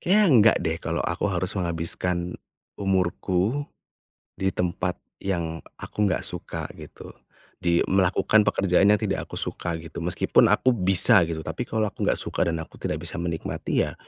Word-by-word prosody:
kayaknya 205 +4 +4
enggak 115 - +6
deh 80 0 -1
kalau 80 +1 -1
aku 85 - -1
harus 95 +1 -2
menghabiskan, 85 0 -2 0.4
umurku, 95 +6 0 0.7
di 95 - -1
tempat 90 0 -2 0.2
yang 85 -4 -2 0.2
aku 105 -1 -1
nggak 90 - -1
suka - - -4
gitu. - - -11 0.5
Di 85 -1 +3
melakukan 95 +3 +3
pekerjaan 95 +1 +3
yang 105 - +5
tidak - - -2
aku - - -6
suka 85 -1 -3
gitu 85 +1 -8
meskipun 85 +1 +3
aku 130 -1 +3
bisa 95 +1 +5
gitu 80 -1 -3
tapi 80 +9 -3
kalau 110 -2 -1
aku - - -6
gak - - +1
suka - - -1
dan 80 - -2
aku 80 - -9
tidak 75 - -3
bisa - - -2
menikmati 85 -2 -1
ya - - -7
90 Hz, 160 wpm, -25 LUFS, 85-100 Hz, 0.7 s, enggak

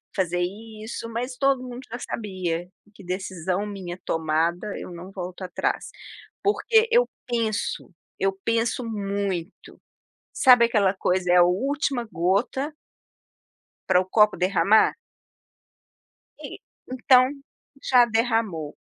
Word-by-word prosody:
fazer 180 -2 0
isso 220 +4 -6
mas 250 +3 -4
todo 275 -1 +2
mundo 250 0 -7
já 240 - -5
sabia, 180 -7 -4 0.2
que 200 - -15
decisão 185 +1 -3
minha 190 -3 -7
tomada 165 +5 -1
eu - - -8
não 175 +2 -9
volto 185 -1 -7
atrás. 180 -1 -2 0.5
Porque 445 +2 +3
eu - - +4 0.2
penso, 225 -5 -2 0.3
eu 195 0 +2
penso 230 +2 0
muito. 200 -4 -4 0.5
Sabe 250 -4 +6
aquela 205 -5 +2
coisa, 180 -2 0
é 180 - +6
a 175 - +8
última 260 +7 0
gota 205 - 0 1.2
pra 180 - +5
o - - -5
copo 210 0 +4
derramar? 190 +3 +3 1.4
E - - -8 0.3
então, 255 +1 +4 0.5
já 250 -2 +5
derramou. 225 -9 -1
205 Hz, 115 wpm, -24 LUFS, 180-240 Hz, 1.4 s, a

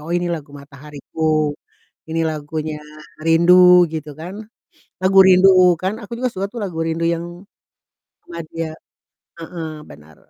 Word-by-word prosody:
oh 170 - -4
ini 175 0 -1
lagu 155 -3 -6
Matahariku, 150 +2 -3 0.6
ini 165 0 -1
lagunya 155 0 -4 0.5
Rindu 180 +2 +6
gitu 155 -1 -6
kan. 180 +4 -7 0.7
Lagu 190 +1 +3
Rindukan 185 0 +4
aku 210 - -12
juga 255 - -1
suka 195 -1 -3
tuh 240 - -7
lagu 175 -4 -6
Rindu 165 +1 -2
yang 170 0 -1 1.1
madya 165 -1 -6 0.7
heeh, 165 -1 -7 0.2
benar 75 0 -16
165 Hz, 120 wpm, -19 LUFS, 155-180 Hz, 1.1 s, Rindu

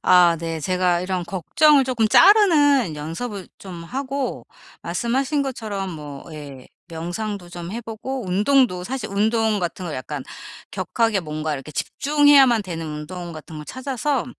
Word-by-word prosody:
아 175 -2 +6
네. 165 -1 -4
제가 180 +1 +1
이런 185 -1 -2
걱정을 270 - +3
쪼끔 235 -4 +1
자르는 290 - +5
연습을 185 +7 -5
좀 180 -4 -9
하고 270 +5 -4 0.4
말씀하신 265 +4 0
것처럼 215 -8 -4
뭐 145 -4 -8
예 140 -4 -10 0.2
명상도 175 +3 -5
좀 175 +1 -7
해 235 - -4
보고 235 +2 -5
운동도 200 0 +2
사실 250 -2 -4
운동 220 +1 +1
같은 180 +1 -4
거 160 - -4
약간 135 +1 -5 0.5
격하게 225 -3 0
뭔가 155 -1 -3
이렇게 145 +1 -6
집중해야만 275 - +4
되는 165 -4 -5
운동 170 +3 -6
같은 155 0 -10
걸 150 - -7
찾아서 260 - -2
195 Hz, 295 characters per minute, -22 LUFS, 165-255 Hz, 0.5 s, 아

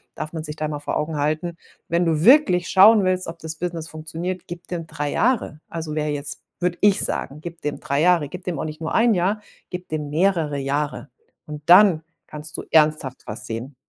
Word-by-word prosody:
darf 155 - -6
man 160 -1 -4
sich 150 -1 -4
da 155 - -2
mal 150 -1 -4
vor 145 - -3
Augen 155 +1 -2
halten. 155 +4 -1 0.3
Wenn 170 +1 +1
du 160 0 +1
wirklich 215 - +5
schauen 200 +1 +6
willst, 185 0 +1
ob 165 +1 -7
das 160 0 -4
Business 165 -1 -4
funktioniert, 165 +3 -6
gib 175 0 -9
dem 165 -3 -5
3 145 -1 -3
Jahre. 225 - 0
Also, 160 -2 -5
wer 150 -1 -1
jetzt 145 0 -3 0.3
würde 175 -1 -1
ich 205 -1 +4
sagen. 145 +3 -2
Gib 170 0 -8
dem 150 -1 -4
3 140 +1 -1
Jahre. 170 -4 +3
Gib 180 0 -9
dem 175 -5 -3
auch - - -3
nicht 155 0 -6
nur 160 0 -4
1 230 0 +4
Jahr, 200 +3 0 0.3
gib 180 -1 -7
dem 150 -2 -3
mehrere 160 -3 +1
Jahre. 140 +2 -2 0.4
Und 150 -1 -8
dann 180 -2 +7 0.2
kannst 150 0 -6
du - - -5
ernsthaft 155 -4 +2
was 105 - -5
sehen. 120 +5 -6
160 Hz, 210 wpm, -22 LUFS, 150-180 Hz, 0.4 s, dann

